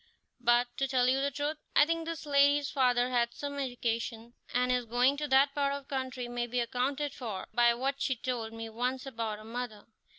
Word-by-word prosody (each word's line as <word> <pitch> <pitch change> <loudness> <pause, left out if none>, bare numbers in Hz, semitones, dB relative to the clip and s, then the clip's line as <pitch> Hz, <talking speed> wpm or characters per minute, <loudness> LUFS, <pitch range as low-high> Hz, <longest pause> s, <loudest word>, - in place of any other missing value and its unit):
But, 240 0 +4
to 270 - +1
tell 255 -1 +2
you 265 +1 +3
the 280 - +1
truth, 290 +3 -2 0.2
I 295 - +7
think 330 +1 -1
this 330 -1 -5
lady's 285 0 +4
father 250 -2 +2
had 235 -1 +1
some 285 -1 -5
education, 235 -2 -3 0.2
and 250 +1 +2
his 250 -1 +1
going 245 +4 +3
to 300 +1 -2
that 275 +1 +4
part 280 -1 +1
of 280 0 -5
the 275 - -4
country 260 -2 -3
may 240 0 -2
be 245 +1 -1
accounted 265 +4 -1
for 220 -8 -5
by 240 0 +4
what 275 +3 -2
she 260 - +1
told 240 -3 -3
me 225 0 -6
once 250 +4 -2
about 225 -5 -3
her 215 - -12
mother. 230 -2 -5
250 Hz, 210 wpm, -31 LUFS, 240-280 Hz, 0.2 s, I